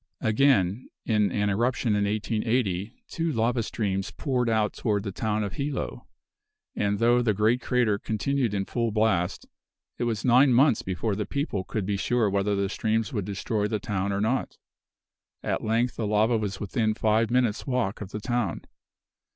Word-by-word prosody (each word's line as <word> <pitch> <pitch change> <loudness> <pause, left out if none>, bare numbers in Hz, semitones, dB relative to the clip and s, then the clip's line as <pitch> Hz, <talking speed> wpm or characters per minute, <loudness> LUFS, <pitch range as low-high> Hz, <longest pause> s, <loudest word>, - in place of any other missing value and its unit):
Again, 110 -2 +2 0.2
in 105 -4 +2
an 105 +1 0
eruption 120 +4 0
in 105 0 +1
1880, 105 -1 -1 0.2
two 165 0 -2
lava 115 -1 +1
streams 100 -3 -2
poured 125 -5 -1
out 110 -2 +1
toward 105 -3 -1
the 100 - -4
town 105 +2 -1
of 100 -2 -4
Hilo; 140 +5 -4 0.7
and 100 0 0
though 120 +3 +4
the 110 -4 +1
great 110 +5 +2
crater 120 -6 +1
continued 120 +1 -1
in 95 -1 -1
full 115 +2 -1
blast, 105 -4 0 0.5
it - - 0
was 110 -3 -2
nine 130 +2 +5
months 130 -1 +4
before 95 +3 -2
the 105 0 -3
people 140 - -2
could 105 +1 -3
be 100 0 -1
sure 115 0 +1
whether 100 +1 +1
the 100 0 0
streams 110 +5 -1
would 105 -5 -2
destroy 105 +1 -1
the 110 - -1
town 100 -1 -2
or 100 0 -1
not. 120 +5 -1 0.9
At - - -1
length 115 +3 0
the 110 - -1
lava 110 +3 +3
was 105 -3 -2
within 110 +1 0
five 110 +1 +2
minutes 120 -2 +1
walk 125 -7 -1
of 100 - -6
the 105 - -5
town. 120 -5 -1
110 Hz, 175 wpm, -26 LUFS, 100-120 Hz, 0.9 s, nine